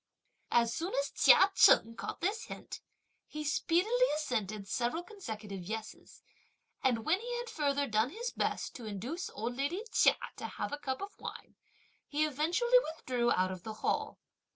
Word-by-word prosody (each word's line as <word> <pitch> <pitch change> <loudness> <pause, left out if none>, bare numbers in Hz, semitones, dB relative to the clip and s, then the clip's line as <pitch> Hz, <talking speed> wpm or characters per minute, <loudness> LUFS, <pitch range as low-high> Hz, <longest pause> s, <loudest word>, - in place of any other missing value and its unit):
As 235 -1 +3
soon 340 +8 -3
as 280 - -2
Chia 390 +1 +6
Cheng 230 -9 +6
caught - - -6
this 405 +6 -1
hint, - - -8 0.5
he 305 0 -5
speedily 375 +11 +2
assented 215 -9 -2
several 245 - -1
consecutive 220 - -7
yes's; 220 +4 -7 0.6
and 235 -4 +1
when 360 +4 +3
he 485 +1 -3
had 480 -1 -5
further 285 -2 +1
done 220 +1 +2
his 470 - -4
best - - -2
to 240 - -9
induce 240 - -4
old 230 +3 -4
lady 285 - -1
Chia - - +5 0.2
to - - -4
have - - -5
a 290 - -3
cup 265 +1 -3
of 405 - -9
wine, - - -8 0.5
he 305 +1 +1
eventually 345 - +3 0.2
withdrew 245 -5 0
out 185 0 +1
of 185 -1 -6
the 220 +4 -6
Hall. - - 0
280 Hz, 165 wpm, -32 LUFS, 225-360 Hz, 0.6 s, Chia